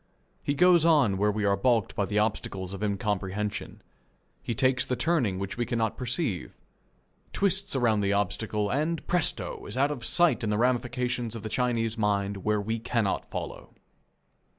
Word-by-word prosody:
He 145 Hz, -, -1 dB
goes 180 Hz, +1 st, +5 dB
on 145 Hz, -, +4 dB
where 105 Hz, +1 st, +3 dB
we 105 Hz, 0 st, -1 dB
are 100 Hz, 0 st, +3 dB
balked 115 Hz, 0 st, +1 dB
by 100 Hz, -, +1 dB
the 105 Hz, -, -1 dB
obstacles 100 Hz, -3 st, -1 dB
of 100 Hz, -, -7 dB
incomprehension. 105 Hz, 0 st, -2 dB, 0.6 s
He 120 Hz, -, -3 dB
takes 130 Hz, +1 st, +3 dB
the 125 Hz, 0 st, -1 dB
turning 125 Hz, -, +1 dB
which 100 Hz, +3 st, -4 dB
we 120 Hz, -, 0 dB
cannot 115 Hz, -2 st, 0 dB
perceive, 125 Hz, -, -2 dB, 0.8 s
twists 195 Hz, -3 st, +1 dB
around 115 Hz, -5 st, +2 dB
the 100 Hz, -1 st, +1 dB
obstacle, 105 Hz, +1 st, -1 dB
and, 155 Hz, +3 st, -1 dB
presto! 175 Hz, -2 st, -1 dB
is -, -, -3 dB
out 140 Hz, +2 st, +3 dB
of 130 Hz, -5 st, -5 dB
sight 175 Hz, -3 st, +2 dB
in 110 Hz, -, 0 dB
the 105 Hz, -, +1 dB
ramifications 125 Hz, -1 st, 0 dB
of 115 Hz, -, -7 dB
the 110 Hz, -, -4 dB
Chinese 115 Hz, -2 st, 0 dB
mind 100 Hz, -1 st, 0 dB
where 105 Hz, +2 st, 0 dB
we 110 Hz, +3 st, -2 dB
cannot 115 Hz, -3 st, -1 dB
follow. -, -, -7 dB
115 Hz, 170 wpm, -28 LUFS, 105-130 Hz, 0.8 s, goes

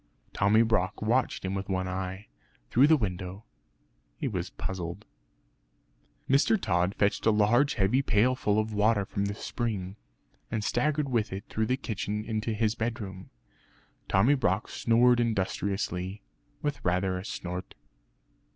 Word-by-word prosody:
Tommy 105 Hz, +3 st, +4 dB
Brock 105 Hz, -4 st, 0 dB
watched 115 Hz, -1 st, 0 dB
him 95 Hz, -, -2 dB
with 95 Hz, 0 st, -4 dB
one 95 Hz, -1 st, -1 dB
eye, 95 Hz, +2 st, -4 dB, 0.5 s
through 130 Hz, +5 st, +6 dB
the 160 Hz, 0 st, +6 dB
window. 95 Hz, -2 st, -4 dB, 0.7 s
He -, -, -2 dB
was -, -, -3 dB
puzzled. 90 Hz, +2 st, -5 dB, 1.2 s
Mr. 140 Hz, +11 st, +4 dB
Tod 90 Hz, -, +1 dB
fetched 105 Hz, +2 st, +1 dB
a -, -, +7 dB
large 110 Hz, +6 st, +3 dB
heavy 105 Hz, +7 st, +2 dB
pailful 115 Hz, -3 st, +2 dB
of 110 Hz, 0 st, 0 dB
water 105 Hz, -1 st, +2 dB
from 100 Hz, +1 st, -2 dB
the 100 Hz, 0 st, -3 dB
spring, 105 Hz, -5 st, -4 dB, 0.5 s
and 110 Hz, -2 st, -2 dB
staggered 145 Hz, +6 st, +1 dB
with 115 Hz, -4 st, 0 dB
it 95 Hz, +1 st, -5 dB
through 110 Hz, 0 st, -1 dB
the 130 Hz, -, +1 dB
kitchen 105 Hz, -3 st, -3 dB
into 110 Hz, 0 st, -2 dB
his 110 Hz, 0 st, +1 dB
bedroom. 110 Hz, -5 st, -4 dB, 0.8 s
Tommy 110 Hz, +9 st, +4 dB
Brock 105 Hz, -7 st, 0 dB
snored 120 Hz, +1 st, +3 dB
industriously, 100 Hz, -3 st, -1 dB, 0.4 s
with 145 Hz, -1 st, -2 dB
rather 90 Hz, +1 st, +1 dB
a -, -, -7 dB
snort. 90 Hz, -2 st, -6 dB
105 Hz, 140 wpm, -28 LUFS, 95-115 Hz, 1.2 s, a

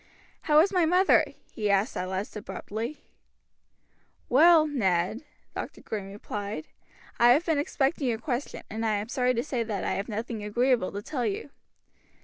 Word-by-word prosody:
"How 300 Hz, -, +6 dB
is 390 Hz, +4 st, +1 dB
my 360 Hz, -2 st, +3 dB
mother?" 360 Hz, +4 st, +5 dB, 0.3 s
he 210 Hz, -2 st, -2 dB
asked 200 Hz, +4 st, +2 dB
at 185 Hz, -, -3 dB
last 190 Hz, +3 st, -4 dB
abruptly. 220 Hz, +5 st, -6 dB, 1.3 s
"Well, 315 Hz, +4 st, +7 dB
Ned," 215 Hz, -, 0 dB, 0.3 s
Dr. -, -, -6 dB
Green 200 Hz, -3 st, -5 dB
replied, 200 Hz, -4 st, -5 dB, 0.5 s
"I 240 Hz, -, +7 dB
have 310 Hz, +7 st, +1 dB
been 320 Hz, -4 st, +1 dB
expecting 285 Hz, 0 st, 0 dB
your 230 Hz, -2 st, 0 dB
question, 245 Hz, +3 st, -4 dB
and 225 Hz, +1 st, -4 dB
I 220 Hz, -2 st, +1 dB
am 205 Hz, +2 st, -3 dB
sorry 250 Hz, 0 st, +1 dB
to 235 Hz, -, 0 dB
say 260 Hz, -5 st, -2 dB
that 215 Hz, -4 st, -3 dB
I -, -, -1 dB
have 200 Hz, +3 st, -3 dB
nothing 220 Hz, 0 st, -4 dB
agreeable 240 Hz, 0 st, +1 dB
to 200 Hz, +1 st, -5 dB
tell 250 Hz, -4 st, -2 dB
you." 210 Hz, +7 st, -4 dB
230 Hz, 165 wpm, -27 LUFS, 205-280 Hz, 1.3 s, Well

